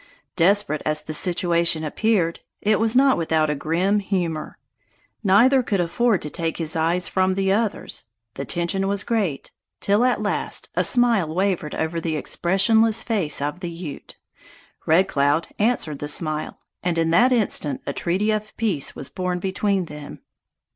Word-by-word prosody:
Desperate 180 -4 +2
as 155 0 0
the 155 - -6
situation 170 -1 +1
appeared, 170 +1 0 0.2
it 215 0 +1
was 225 +1 +1
not 270 0 +5
without 160 -2 +1
a - - -1
grim 175 +8 0
humor. 175 -6 -3 0.7
Neither 235 +7 +5
could 205 -5 -1
afford 195 +5 +1
to 150 - -4
take 165 -1 -3
his 160 -2 -2
eyes 170 +3 +1
from 185 0 +1
the 195 0 0
other's; 210 - -2 0.3
the 135 - -5
tension 175 +4 -1
was 200 -1 -1
great, 200 -12 -2 0.3
till 205 +4 +2
at 250 -3 +2
last 210 -1 -2
a - - +1
smile 235 - +3
wavered 185 -3 -1
over 160 +1 -2
the 160 -1 -2
expressionless 215 +8 +2
face 195 - +1
of 150 +5 -3
the 175 -2 -5
Ute. 165 -3 -9 0.7
Red 170 +4 +4
Cloud 145 +3 +1
answered 205 - 0
the 145 - -4
smile, 155 0 -1 0.2
and 175 -2 -1
in 165 0 +1
that 240 +9 +4
instant 195 - 0
a - - -3
treaty 190 +5 0
of 215 0 -4
peace 195 -11 0
was 135 - -5
born 180 +4 -3
between 190 +1 -1
them. 150 -2 -10
180 Hz, 160 wpm, -22 LUFS, 160-210 Hz, 0.7 s, not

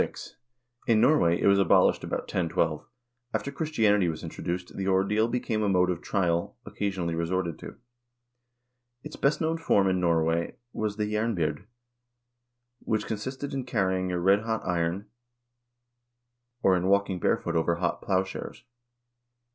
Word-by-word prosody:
* 120 0 -40
In 110 - +5
Norway 115 - +4
it - - 0
was 100 0 +5
abolished 100 - +4
about - - -2
1012. 80 -2 -1 0.5
After 140 - -2
Christianity 110 - +2
was 80 - -5
introduced, 90 +1 -5
the 95 -1 -3
ordeal 100 +4 +2
became 115 -2 -1
a 105 - +1
mode 90 -1 +3
of 85 - -4
trial 85 -3 -1
occasionally 95 -5 -3
resorted 85 0 -2
to. - - -9 1.3
Its 150 - -8
best 140 +2 +1
known 165 +1 0
form 100 -11 +3
in 95 -1 +1
Norway 85 -1 +1 0.2
was 105 -1 -2
the 105 - 0
jernbyrd, 105 -3 -1 1.1
which 110 -2 -1
con 110 - -3
sisted 130 +6 -5
in 135 -1 -2
carrying 95 -6 0
a 90 - -1
redhot 105 +5 +1
iron, 90 +3 -1 1.6
or 95 - +5
in 90 +1 0
walking 100 -2 +2
barefooted 80 - +1
over 85 +1 +1
hot 85 +1 -2
plowshares. 95 +3 -2
95 Hz, 140 wpm, -27 LUFS, 90-110 Hz, 1.6 s, In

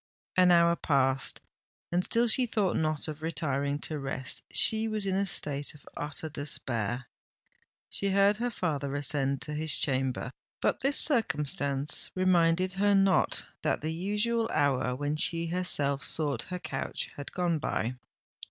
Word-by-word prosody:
An 185 -1 +5
hour 170 0 +5
passed—and 135 +5 -2
still 235 +4 +1
she 245 +2 +2
thought 210 -5 0
not 155 -1 -1
of 155 0 -6
retiring 145 -3 -1
to 155 -2 -3
rest;—she 135 +11 +2
was 215 -2 -1
in 190 -1 0
a 200 +1 0
state 145 -5 -1
of 145 - -19
utter 150 +2 -4
despair! 125 -5 -2 0.8
She 200 - -1
heard 200 +1 +3
her 245 +2 -1
father 145 - -2
ascend 140 -1 -1
to 150 - -5
his 155 0 +4
chamber: 130 -2 +1 0.3
but - - 0
this 275 +2 0
circumstance 150 - 0
reminded 185 0 +2
her 200 +1 +2
not 195 -1 +2 0.2
that - - 0
the 155 +1 -3
usual 210 +6 -1
hour 130 -3 +1
when 145 +3 -2
she 165 +1 +1
herself 145 -6 0
sought 145 -6 +1
her 180 - -3
couch - - -4
had 145 - -7
gone 175 -3 0
by. 120 -3 -2
160 Hz, 145 wpm, -29 LUFS, 140-190 Hz, 0.8 s, An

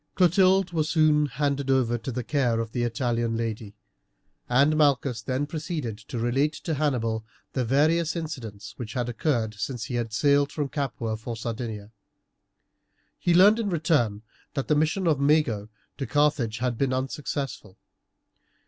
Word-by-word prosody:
Clotilde 185 +1 +4
was 155 -2 0
soon 155 -2 +4
handed 140 +1 -1
over 130 -3 +2
to 120 +3 -4
the 125 +1 -3
care 120 -4 +1
of 115 -1 -3
the 120 - -2
Italian 120 -1 0
lady, 110 -2 -4 0.7
and 140 +5 +4
Malchus 140 -6 +2
then 130 +6 -1
proceeded 150 -6 -4
to 110 +3 -7
relate 135 +6 +1
to 160 - -4
Hannibal 120 -7 0 0.3
the 130 - 0
various 155 +6 +2
incidents 120 -10 -6
which 115 -3 -6
had 125 -2 -1
occurred 115 -3 0
since 115 +3 -4
he 125 - -6
had 120 -2 -2
sailed 140 +4 +3
from 145 -3 -2
Capua 125 -6 -3
for 115 +1 -6
Sardinia. 110 -2 -5 1.3
He 175 -1 +2
learned 205 +5 +7
in 215 -3 -1
return 145 - +1 0.3
that 135 - -2
the 150 - +3
mission 160 +5 +1
of 155 -4 +2
Mago 140 -8 +2 0.3
to 135 - -3
Carthage 140 -5 +1
had 125 -2 -2
been 135 -2 +1
unsuccessful. 135 -5 -4
130 Hz, 155 wpm, -26 LUFS, 115-150 Hz, 1.3 s, learned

